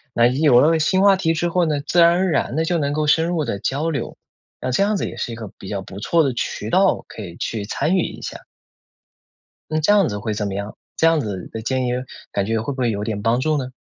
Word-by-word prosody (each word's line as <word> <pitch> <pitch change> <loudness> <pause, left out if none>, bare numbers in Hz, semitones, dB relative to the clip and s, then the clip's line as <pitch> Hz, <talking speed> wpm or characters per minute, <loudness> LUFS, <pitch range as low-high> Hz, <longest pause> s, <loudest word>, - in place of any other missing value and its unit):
那 120 - +5
有 130 0 +4
了 160 +3 +4
新 185 +5 +2
话 200 -1 +6
题 165 -4 +1
之 175 +2 0
后 175 0 +2
呢， 150 -3 0
自 175 +3 +3
然 170 - +8
而 185 +1 +1
然 140 -3 0
地 160 +1 +1
就 170 0 0
能 145 -1 -1
够 155 0 0
深 160 +2 +3
入 170 -3 -1
地 100 - -3
交 145 +9 -1
流， 140 -6 -4 0.4
那 130 - -3
这 125 - +1
样 205 +1 +1
子 - - -2
也 - - -8
是 - - -3
一 - - -5
个 110 -3 -8
比 95 - -9
较 100 -2 -3
不 95 +1 -9
错 165 +10 +2
的 135 -3 0
渠 110 -2 -3
道， 190 +1 +3
可 - - -9
以 85 -4 -8
去 110 -3 -3
参 155 - 0
与 185 - +3
一 - - -5
下。 - - -6 1.3
那 155 - +1
这 160 +7 +3
样 200 -4 +4
子 105 - -4
会 110 0 -3
怎 105 0 -2
么 100 - -4
样？ 100 +2 -5 0.2
这 165 - +4
样 165 -2 +3
子 100 -7 -5
的 110 - -6
建 130 +2 -1
议 - - 0 0.4
感 100 - 0
觉 110 +2 0
会 120 +6 -3
不 130 - -9
会 120 -2 +2
有 105 0 -3
点 105 -2 -3
帮 115 +3 +2
助 155 +3 +1
呢？ 130 -2 -4
140 Hz, 295 characters per minute, -21 LUFS, 110-165 Hz, 1.3 s, 然